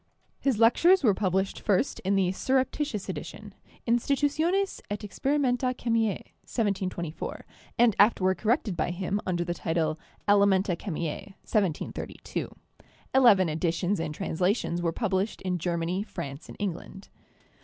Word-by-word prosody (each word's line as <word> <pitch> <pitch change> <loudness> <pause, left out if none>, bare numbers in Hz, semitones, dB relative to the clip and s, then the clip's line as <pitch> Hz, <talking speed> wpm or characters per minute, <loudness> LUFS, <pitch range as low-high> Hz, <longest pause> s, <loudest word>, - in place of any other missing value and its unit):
His 270 -5 +1
lectures 330 - +5
were 215 -5 +5
published 190 0 0
first 205 +6 +1
in 195 +2 0
the 190 -2 +2
'surreptitious 260 0 -1
edition/ - - -7 0.3
Tnstitutiones 295 +10 +1
et 205 0 -3
Experimenta 255 +3 0
Chemiae' 230 -4 0 0.2
(1724) 185 -7 -3 0.3
and 235 -4 +4
afterward 190 -4 +4
corrected 220 - +1
by 165 - -1
him 190 +3 -2
under 175 -2 0
the 175 0 -2
title 160 -2 -1 0.3
'Elementa 200 -2 +4
Chemise' 170 +2 -5
(1732). 195 -8 -2 0.6
Eleven 235 -9 +6
editions 170 +4 0
and 155 -2 -3
translations 180 +1 0
were 170 -1 +1
published 195 +1 -1
in 180 -1 -1
Germany, 170 +2 -1
France, 165 -8 -7
and - - -10
England. 195 0 -5
195 Hz, 120 wpm, -27 LUFS, 175-230 Hz, 0.6 s, Eleven